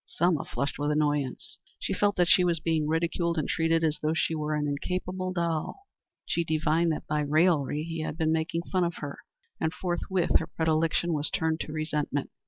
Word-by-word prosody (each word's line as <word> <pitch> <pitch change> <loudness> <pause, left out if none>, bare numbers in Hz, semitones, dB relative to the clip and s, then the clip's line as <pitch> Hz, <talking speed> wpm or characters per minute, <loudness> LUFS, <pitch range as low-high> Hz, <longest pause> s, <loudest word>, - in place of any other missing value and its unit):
Selma 170 -3 +1
flushed 140 +1 -3
with 145 +1 0
annoyance. 145 -3 -1 0.2
She - - -2
felt 205 0 +2
that 175 -1 +3
she 180 - +6
was 170 -2 +2
being 155 -1 0
ridiculed 170 +1 0
and 155 - 0
treated 165 0 +1
as 155 -1 +1
though 155 +1 +1
she 165 - +1
were 155 -1 -1
an 150 -1 0
incapable 185 +5 -2
doll. 170 - -2 0.4
She 170 - 0
divined 160 +1 +1
that 155 - -3
by 150 0 0
his 145 - -3
raillery 155 -2 +3
he 165 0 -5
had 155 0 -4
been 160 -1 +1
making 160 +1 0
fun 185 -1 +2
of 170 -1 -1
her, 145 -1 -6 0.4
and 160 - 0
forthwith 180 0 +1
her 160 - -4
predilection 160 +1 +1
was 150 -1 0
turned 160 0 0
to - - -4
resentment. 150 -2 -2
160 Hz, 195 wpm, -28 LUFS, 150-170 Hz, 0.4 s, she